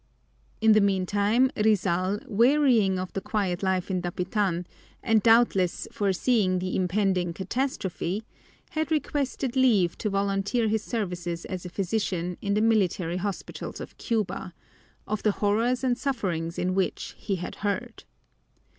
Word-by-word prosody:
In 220 Hz, 0 st, +6 dB
the 215 Hz, 0 st, +6 dB
meantime 205 Hz, +6 st, +2 dB
Rizal, 195 Hz, -2 st, +1 dB
wearying 235 Hz, -4 st, +3 dB
of 185 Hz, 0 st, -5 dB
the 195 Hz, -, -2 dB
quiet 190 Hz, -5 st, -1 dB
life 190 Hz, 0 st, 0 dB
in 185 Hz, -1 st, 0 dB
Dapitan 180 Hz, 0 st, -1 dB, 0.4 s
and 225 Hz, -2 st, +3 dB
doubtless 225 Hz, -6 st, +3 dB
foreseeing 200 Hz, 0 st, +1 dB
the 185 Hz, 0 st, -2 dB
impending 185 Hz, -1 st, +1 dB
catastrophe, 195 Hz, -2 st, -2 dB, 0.5 s
had 315 Hz, -2 st, -1 dB
requested 280 Hz, -4 st, -1 dB
leave 220 Hz, -10 st, +3 dB
to 210 Hz, -, -1 dB
volunteer 200 Hz, +3 st, 0 dB
his 220 Hz, 0 st, +1 dB
services 175 Hz, -6 st, -3 dB
as 185 Hz, -1 st, -5 dB
a -, -, -7 dB
physician 180 Hz, -2 st, -2 dB
in 200 Hz, 0 st, 0 dB
the 210 Hz, -, +2 dB
military 185 Hz, -6 st, +1 dB
hospitals 195 Hz, +1 st, -5 dB
of -, -, -8 dB
Cuba, 190 Hz, -5 st, -2 dB, 0.5 s
of 215 Hz, 0 st, -2 dB
the 210 Hz, -, +2 dB
horrors 230 Hz, +6 st, +1 dB
and 250 Hz, -2 st, +2 dB
sufferings 185 Hz, -, -2 dB
in 185 Hz, +1 st, 0 dB
which 190 Hz, -1 st, -1 dB
he 200 Hz, -, -2 dB
had 175 Hz, -1 st, -6 dB
heard. 210 Hz, +4 st, -3 dB
200 Hz, 135 wpm, -26 LUFS, 185-225 Hz, 0.5 s, In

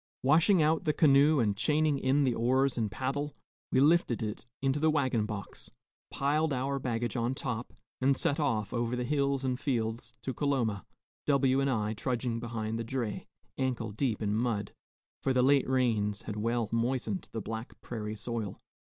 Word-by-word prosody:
Washing 160 Hz, +6 st, +5 dB
out 155 Hz, +1 st, +2 dB
the 150 Hz, -, +2 dB
canoe 145 Hz, 0 st, +5 dB
and 105 Hz, -4 st, +2 dB
chaining 150 Hz, +4 st, +2 dB
in 135 Hz, +2 st, +2 dB
the 130 Hz, -3 st, +2 dB
oars 130 Hz, +3 st, +2 dB
and 110 Hz, -3 st, 0 dB
paddle, 140 Hz, +6 st, -3 dB, 0.4 s
we 130 Hz, -, +3 dB
lifted 145 Hz, -5 st, +3 dB
it 105 Hz, +2 st, -5 dB
into 135 Hz, +1 st, +1 dB
the 160 Hz, +1 st, +3 dB
wagon 130 Hz, -8 st, +1 dB
box, 100 Hz, -4 st, -6 dB, 0.4 s
piled 150 Hz, +3 st, +1 dB
our 135 Hz, +1 st, -1 dB
baggage 120 Hz, -3 st, -2 dB
on 120 Hz, +2 st, 0 dB
top, 120 Hz, -3 st, -3 dB, 0.3 s
and 135 Hz, +1 st, +3 dB
set 145 Hz, -, 0 dB
off 115 Hz, -8 st, 0 dB
over 120 Hz, 0 st, 0 dB
the 125 Hz, -, -2 dB
hills 140 Hz, 0 st, 0 dB
and 125 Hz, -1 st, -1 dB
fields 115 Hz, -5 st, -2 dB
to 130 Hz, -, -2 dB
Coloma, 120 Hz, -, -1 dB, 0.4 s
W 135 Hz, -2 st, +3 dB
and 140 Hz, -, +1 dB
I 110 Hz, -4 st, 0 dB
trudging 120 Hz, +1 st, -2 dB
behind 115 Hz, -1 st, -3 dB
the -, -, -2 dB
dray, 115 Hz, -2 st, -3 dB, 0.3 s
ankle 125 Hz, -4 st, -1 dB
deep 115 Hz, 0 st, -1 dB
in 105 Hz, 0 st, 0 dB
mud, 110 Hz, -3 st, -1 dB, 0.5 s
for 135 Hz, -, +1 dB
the 125 Hz, -1 st, +3 dB
late 140 Hz, 0 st, +4 dB
rains 110 Hz, -6 st, +1 dB
had 105 Hz, -, -5 dB
well 115 Hz, +1 st, 0 dB
moistened 125 Hz, +10 st, -1 dB
the 115 Hz, -, -3 dB
black 110 Hz, +2 st, -6 dB
prairie 110 Hz, -2 st, -5 dB
soil. 110 Hz, -2 st, -4 dB
125 Hz, 175 wpm, -30 LUFS, 115-140 Hz, 0.5 s, Washing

